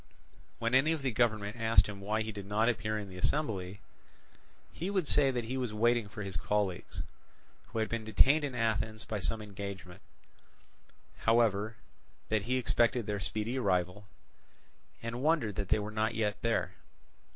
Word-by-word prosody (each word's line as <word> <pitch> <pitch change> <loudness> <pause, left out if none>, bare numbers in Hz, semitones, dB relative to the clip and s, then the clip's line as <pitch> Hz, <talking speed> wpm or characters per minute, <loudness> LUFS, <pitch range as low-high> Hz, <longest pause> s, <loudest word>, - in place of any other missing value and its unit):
When 115 +1 -1
any 140 +5 +5
of 155 -4 -4
the 130 - +1
government 110 -2 +1
asked 115 0 +5
him 100 -2 -7
why 110 +2 0
he 110 - -4
did 100 -2 -8
not 105 +3 +2
appear 110 -2 0
in 105 -1 -5
the 90 -1 -9
assembly, 100 - -1 0.9
he 175 +4 -3
would 190 -6 0
say 140 -2 +4
that 125 -2 -1
he 125 +4 -3
was 125 -5 -2
waiting 120 0 +3
for 105 0 -6
his 95 -2 -4
colleagues, 100 0 -1 0.6
who - - -7
had 110 0 +1
been 115 -1 -3
detained 135 +7 +4
in 140 -3 -3
Athens 110 -1 -1
by 110 -2 -3
some 110 +3 -2
engagement; 100 -3 -7 1.2
however, 110 -2 +2 0.5
that 110 -2 +1
he 130 +2 +1
expected 120 -1 +2
their 105 -1 -2
speedy 110 +6 -2
arrival, 95 -1 0 1.0
and 115 +2 -4
wondered 150 -8 +2
that 100 -1 -3
they 110 - +4
were 105 0 -4
not 110 +1 0
yet 105 -2 -1
there. 115 -1 +1
110 Hz, 170 wpm, -32 LUFS, 105-120 Hz, 1.2 s, any